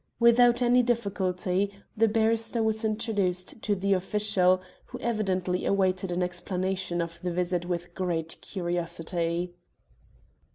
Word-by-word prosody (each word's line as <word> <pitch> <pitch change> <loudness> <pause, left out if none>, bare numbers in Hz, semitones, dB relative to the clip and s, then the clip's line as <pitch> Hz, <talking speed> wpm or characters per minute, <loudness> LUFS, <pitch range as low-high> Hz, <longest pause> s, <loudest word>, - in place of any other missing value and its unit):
Without 240 +1 +5
any 245 +1 +5
difficulty, 200 -4 0 0.2
the 225 +1 +4
barrister 225 +1 +1
was 220 0 0
introduced 210 -4 0
to 205 - +1
the 200 +1 +1
official, 190 -1 +2 0.3
who 250 - -8
evidently 190 -7 -1
awaited 190 -1 +1
an 180 +1 0
explanation 180 0 -2
of 170 0 -9
the 180 - -2
visit 175 0 -1
with 175 -1 -4
great 170 -3 -3
curiosity. 175 -1 -2
190 Hz, 120 wpm, -27 LUFS, 180-220 Hz, 0.3 s, Without